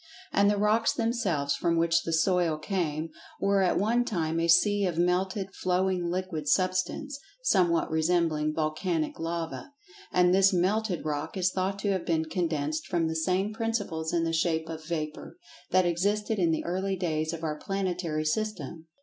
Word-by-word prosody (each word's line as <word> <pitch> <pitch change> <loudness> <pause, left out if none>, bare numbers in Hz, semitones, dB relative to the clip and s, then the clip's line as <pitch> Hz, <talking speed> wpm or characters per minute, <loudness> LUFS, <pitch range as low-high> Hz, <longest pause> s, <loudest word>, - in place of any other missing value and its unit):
And 200 0 +4
the 205 - +1
rocks 210 +2 +2
themselves, 195 -12 0
from 170 -1 0
which 165 0 +3
the 165 - -4
"soil" 170 -1 +2
came, 160 -3 -2 0.3
were 200 0 +2
at 185 - +2
one 230 +5 +2
time 165 -8 -1
a 165 - +1
sea 200 +4 +4
of 170 -3 -3
melted, 185 +2 0
flowing 185 -1 0
liquid 175 -4 -3
Substance, 185 - 0 0.2
somewhat 175 - +2
resembling 160 -1 +1
volcanic 155 +1 -1
lava. 165 - -4 0.4
And 180 0 +4
this 195 +1 +5
"melted 185 +1 0
rock" 150 +4 -3
is 185 0 +2
thought 190 +1 -1
to 205 - +1
have 190 -2 -1
been 160 -1 +1
condensed 155 -3 -2
from 170 -3 0
the 160 - -3
same 185 +6 0
principles 205 -8 -2
in 170 -1 +1
the 165 0 -1
shape 160 0 0
of 160 -1 -6
vapor, 155 - -5 0.3
that 185 0 +3
existed 205 +5 0
in 170 -2 +3
the 160 - -1
early 190 +2 -1
days 160 -3 -1
of 165 -1 -6
our 150 -1 -2
planetary 180 -5 -2
system. 165 -4 -3
175 Hz, 165 wpm, -28 LUFS, 160-195 Hz, 0.4 s, this